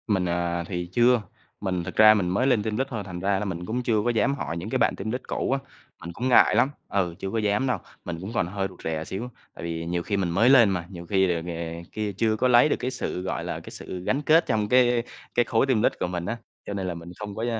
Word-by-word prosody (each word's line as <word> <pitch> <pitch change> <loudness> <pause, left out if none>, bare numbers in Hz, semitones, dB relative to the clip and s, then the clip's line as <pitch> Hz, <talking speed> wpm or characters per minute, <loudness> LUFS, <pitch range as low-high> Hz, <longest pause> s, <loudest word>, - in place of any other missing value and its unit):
Mình 95 -5 +1
à, 85 0 -1
thì 90 -2 -4
chưa. 120 0 +4 0.4
Mình, 90 -3 -1
thực - - -7
ra 110 0 +8
mình 95 -5 0
mới 100 +9 +1
lên 120 -6 +3
team 110 -1 -2
lead 135 +2 0
thôi, 115 -6 -4
thành 90 -2 -6
ra 95 +1 +1
là 105 - -3
mình 90 -3 -4
cũng 120 +6 -2
chưa 110 -3 +2
có - - +2
dám 120 +4 +2
hỏi 85 - -4
những 90 +6 -5
cái 130 - 0
bạn 125 - +2
team 105 +3 -4
lead 125 +2 -3
cũ - - -1
á, 135 - +2 0.4
mình 85 - -7
cũng 125 +8 -2
ngại 125 - +6
lắm, 135 - +4 0.2
ừ, 90 -4 -1
chưa 95 - -4
có 115 - -1
dám 105 +4 +1
đâu. 125 - +1 0.3
Mình 85 - -4
cũng 100 +5 -6
còn 90 - +1
hơi 95 +1 -2
rụt 90 - -15
rè 80 -1 -2
xíu, 110 +9 -5 0.3
tại - - -9
vì 85 0 -3
nhiều 85 0 -2
khi 100 +1 -1
mình 95 -3 0
mới 95 +9 +4
lên 120 -6 +7
mà, 90 -3 -2
nhiều 85 -3 -9
khi 95 -1 +2
ờ, 85 - -2
nghè 85 0 -5
kia 105 -1 -2
chưa 110 0 +2
có 125 - +1
lấy 125 +4 +6
được - - +2
cái 130 - -2
sự, 125 -7 -4
gọi 95 - -3
là, - - -4
cái - - -11
sự 90 -1 -7
gắn 135 +9 0
kết 160 +3 +4
trong 110 -4 0
cái 125 -1 +4 0.3
cái 120 - +4
khối 115 - +2
team 130 -6 +2
lead - - +3
của - - 0
mình 90 -1 -3
á, 120 - -3 0.3
cho - - -5
nên 95 -2 -3
là 90 - -2
mình 85 +1 -9
không 105 -1 -6
có, 115 - -2
100 Hz, 290 wpm, -25 LUFS, 90-120 Hz, 0.4 s, ra